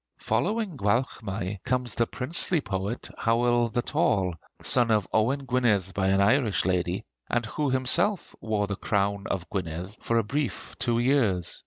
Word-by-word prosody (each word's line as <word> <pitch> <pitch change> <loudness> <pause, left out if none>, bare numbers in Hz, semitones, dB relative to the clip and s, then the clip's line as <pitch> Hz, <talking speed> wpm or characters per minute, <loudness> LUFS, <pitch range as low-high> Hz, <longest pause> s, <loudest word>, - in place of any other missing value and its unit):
Following 210 -5 -1
Gwalchmai 100 -3 -1
comes 125 -2 0
the 115 - +1
princely 160 +6 -1
poet 100 -2 -4
Howel 120 +1 +2
the 120 +2 -1
Tall, 95 -4 +1 0.3
son 120 -2 +5
of 105 -4 +2
Owain 130 +6 +1
Gwynedd 115 -7 +1
by 95 -1 0
an 95 0 +3
Irish 110 0 +3
lady, 90 +2 0 0.2
and 120 -1 0
who 145 +6 -1
himself 130 +10 +1
wore 110 -2 0
the 100 0 -3
crown 100 0 -1
of 90 -3 -2
Gwynedd 90 +1 -4
for 115 - 0
a 115 - +3
brief 140 +4 -3
two 120 -1 +1
years. 120 - +1
115 Hz, 155 wpm, -27 LUFS, 100-125 Hz, 0.3 s, son